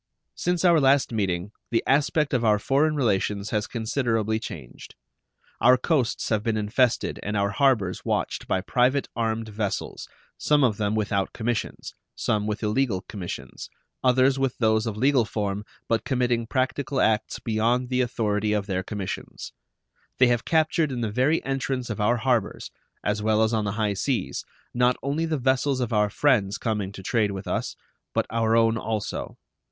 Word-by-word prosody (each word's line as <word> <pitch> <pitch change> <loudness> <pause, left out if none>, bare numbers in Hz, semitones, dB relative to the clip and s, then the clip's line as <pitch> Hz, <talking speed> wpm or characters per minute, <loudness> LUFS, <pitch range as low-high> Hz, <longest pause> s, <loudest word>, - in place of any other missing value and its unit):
Since 180 0 -1
our 170 -2 +6
last 135 -1 +3
meeting 95 -3 -1 0.2
the 115 - +1
aspect 145 +2 +2
of 125 -2 +1
our 105 -2 +4
foreign 145 +8 +1
relations 105 -5 0
has 105 -2 0
considerably 115 -2 -1
changed. 70 - -9 0.6
Our 125 +1 +6
coasts 130 -2 0
have 110 -2 +1
been 110 0 -1
infested 115 +4 +1
and 105 +1 -2
our 100 0 +1
harbors 110 -8 +1
watched - - -2
by 95 - 0
private 125 +7 +1
armed 115 -1 -1
vessels, 105 -2 -4 0.3
some 150 -1 +3
of 110 -5 +2
them 105 0 0
without 100 -2 -1
commissions, 115 -1 -3 0.2
some 105 -1 0
with 105 +1 -3
illegal 105 -3 +1
commissions, 95 -3 -7 0.3
others 130 +1 +4
with 135 -2 0
those 110 -1 +2
of 110 -2 -3
legal 130 +1 +3
form, 105 -1 -3 0.2
but 115 -2 +1
committing 125 -3 0
practical 130 +2 -1
acts 110 -1 +1
beyond 120 +3 0
the 130 0 +1
authority 105 -4 0
of 105 -2 0
their 95 -2 -1
commissions. 100 -1 -6 0.6
They 125 -1 +5
have 120 -1 +1
captured 160 -1 +2
in 125 -2 -3
the 110 -3 -1
very 130 +8 +2
entrance 135 -2 -2
of 105 - -3
our 120 +4 +3
harbors, 120 -2 -1 0.3
as 105 +1 0
well 110 0 +3
as 110 +1 +1
on 110 -2 +1
the 100 - -2
high 105 -1 0
seas, 120 +6 -2 0.3
not 125 0 +2
only 145 +4 -1
the 160 -1 0
vessels 130 +1 +1
of 120 -2 -2
our 105 -1 +3
friends 105 -5 +2
coming 105 -4 -2
to 95 - -9
trade 110 +1 +1
with 100 -1 -6
us, - - -2 0.4
but - - +2
our 115 0 +2
own 115 0 +3
also. 110 -2 -4
115 Hz, 170 wpm, -25 LUFS, 105-130 Hz, 0.6 s, our